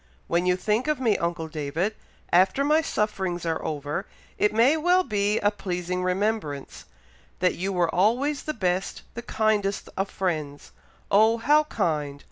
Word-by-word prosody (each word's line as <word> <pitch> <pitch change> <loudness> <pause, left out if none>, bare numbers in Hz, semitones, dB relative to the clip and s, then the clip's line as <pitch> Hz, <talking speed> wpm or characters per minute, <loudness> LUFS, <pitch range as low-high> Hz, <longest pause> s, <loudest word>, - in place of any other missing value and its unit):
When 175 +2 0
you 180 - +4
think 210 +8 0
of 305 -3 0
me, 230 -5 +2
uncle 170 -1 -2
David, 155 +6 -2 0.4
after 190 +9 +4
my 305 +2 +3
sufferings 190 - -2
are 165 -1 -1
over, 145 -1 -3 0.3
it 210 - +3
may 235 +7 +4
well 355 +4 +3
be 205 - 0
a 205 - +3
pleasing 180 -2 -3
remembrance, 185 -6 -2 0.5
that 180 0 +2
you 190 +3 -3
were 175 -3 +1
always 250 +10 +2
the 305 - -4
best, 185 -3 -1
the 235 - -6
kindest 215 -3 0
of 195 +1 -1
friends. 155 -6 -3 0.4
Oh! 220 +3 +5
how 295 +6 +3
kind! 150 - -2
195 Hz, 155 wpm, -25 LUFS, 175-225 Hz, 0.5 s, Oh